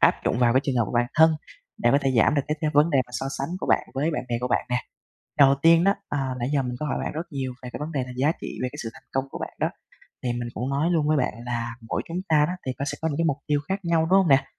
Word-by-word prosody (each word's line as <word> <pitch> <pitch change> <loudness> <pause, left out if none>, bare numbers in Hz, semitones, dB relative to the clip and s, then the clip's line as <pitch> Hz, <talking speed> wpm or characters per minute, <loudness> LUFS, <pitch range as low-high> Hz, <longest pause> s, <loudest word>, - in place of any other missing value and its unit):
áp - - +6
dụng - - +1
vào 120 -1 +4
cái 130 - +4
trường 135 -3 0
hợp 120 - +3
của - - -7
bản 120 0 +3
thân 160 +1 +7 0.5
để 120 - +2
có 140 - +5
thể 135 -2 +1
giảm 140 - +4
được 140 - +2
cái 150 - 0
cái 155 -1 +1
vấn 150 +3 +5
đề 140 - +3
mà - - -19
so 135 - -3
sánh 135 - -2
của - - -3
bạn - - +2
với 150 +5 +1
bạn 150 - -2
bè 120 - 0
của 125 - -1
bạn - - +1
nè. 125 - +1 0.6
Đầu 140 -1 +7
tiên 165 +1 +6
đó, 200 +1 +4
à, 135 -3 -2
nãy 120 - -1
giờ 140 - +3
mình 125 -1 -3
có 150 - -1
hỏi 145 - -1
bạn - - -3
rất 160 +3 -4
nhiều 130 -2 -3
về 125 - -7
cái - - -6
vấn 155 +2 -4
đề 135 -3 -1
là 125 - -8
giá 145 +5 +3
trị - - -6
về 125 - 0
cái - - -10
sự 115 - -5
thành - - -15
công 135 0 0
của - - -6
bạn - - -6
đó. - - +1 0.5
Thì 125 - -1
mình 120 0 -4
cũng 125 +4 -3
nói 150 +5 +1
luôn 155 -3 +2
với 155 -1 +3
bạn 125 - 0
là 120 -1 -3
mỗi - - 0
chúng 170 - -3
ta 150 -1 +5
đó, 180 - -2
thì 130 - -1
có 140 - -1
sẽ 145 0 -3
có 160 - 0
những 145 - -2
cái 165 - +1
mục 145 -3 +1
tiêu 145 -1 +2
khác 195 +1 0
nhau, 170 -1 +3
đúng 195 - +7
hông 185 - +2
nè? 135 0 +5
140 Hz, 335 wpm, -25 LUFS, 125-155 Hz, 0.6 s, thân